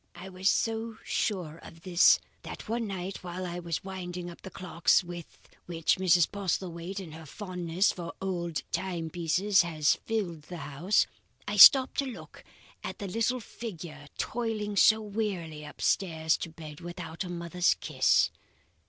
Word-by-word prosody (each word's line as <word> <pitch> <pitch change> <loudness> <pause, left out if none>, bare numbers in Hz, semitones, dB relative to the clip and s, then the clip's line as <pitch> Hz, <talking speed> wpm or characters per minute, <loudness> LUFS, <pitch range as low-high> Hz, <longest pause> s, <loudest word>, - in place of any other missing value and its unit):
"I 180 +2 -9
was 185 +1 +1
so 225 0 0
sure 170 -6 -2
of 165 - -13
this 180 -2 +6 0.2
that - - -8
one 230 +1 -1
night 190 -1 -4
while 180 +1 -5
I 175 0 -4
was 170 +1 -3
winding 180 -2 -6
up 170 - -14
the - - -8
clocks 180 -1 +2
with 175 -1 -9 0.3
which 165 -2 +1
Mrs. 180 -3 +4
Postlethwaite 185 -2 -3
in 180 -5 -8
her 160 0 -10
fondness 180 0 0
for 170 -2 -6
old 175 -4 -3
timepieces 175 +2 +1
has 160 -3 +1
filled 195 -8 -2
the 175 - -7
house, 165 +9 +2 0.4
I - - -2
stopped 265 -2 +9
to 280 - +1
look 250 - -10 0.4
at - - -5
the 200 - -5
little 230 +6 0
figure 170 -10 -8
toiling 220 -3 -2
so 220 +2 +6
wearily 195 -8 -3
upstairs, 160 +1 0
to - - -5
bed, 155 -2 -10
without 175 -1 -6
a 180 - -7
mother's 175 0 +1
kiss. - - +2
180 Hz, 155 wpm, -29 LUFS, 170-200 Hz, 0.4 s, stopped